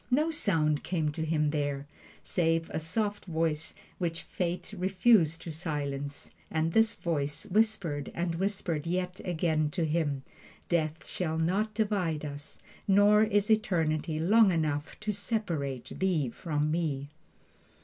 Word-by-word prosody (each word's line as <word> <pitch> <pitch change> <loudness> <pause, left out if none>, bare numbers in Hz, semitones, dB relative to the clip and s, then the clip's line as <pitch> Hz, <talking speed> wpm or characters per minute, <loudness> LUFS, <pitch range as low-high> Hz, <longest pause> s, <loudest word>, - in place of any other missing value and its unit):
No 300 +6 +3
sound 160 - +1
came 160 -4 0
to 160 +2 -3
him 155 -2 +1
there, 145 -2 -1 0.4
save 165 -2 +1
a - - -1
soft 205 +6 -1
voice 160 -3 -1 0.2
which 165 -2 -2
Fate 180 +3 -3
refused 185 -3 +3
to 165 - -5
silence, 145 -3 -4 0.2
and 160 +1 0
this 225 -1 +4
voice 145 0 -2
whispered 195 -8 0
and 170 0 -1
whispered 175 -4 -2
yet 180 +1 -2
again 160 -3 +1
to 170 +2 -1
him: 150 -4 0 0.5
"Death 160 -2 0
shall 160 -3 -2
not 195 +7 0
divide 190 -8 0
us, 145 0 -6 0.3
nor 205 +2 +6
is 210 -1 +3
eternity 165 -7 +1
long 210 +6 +6
enough 155 -3 -1
to 215 0 -1
separate 175 - -2
thee 170 -9 +1
from 150 +3 -1
me!" 145 -4 -1
165 Hz, 135 wpm, -30 LUFS, 150-195 Hz, 0.5 s, nor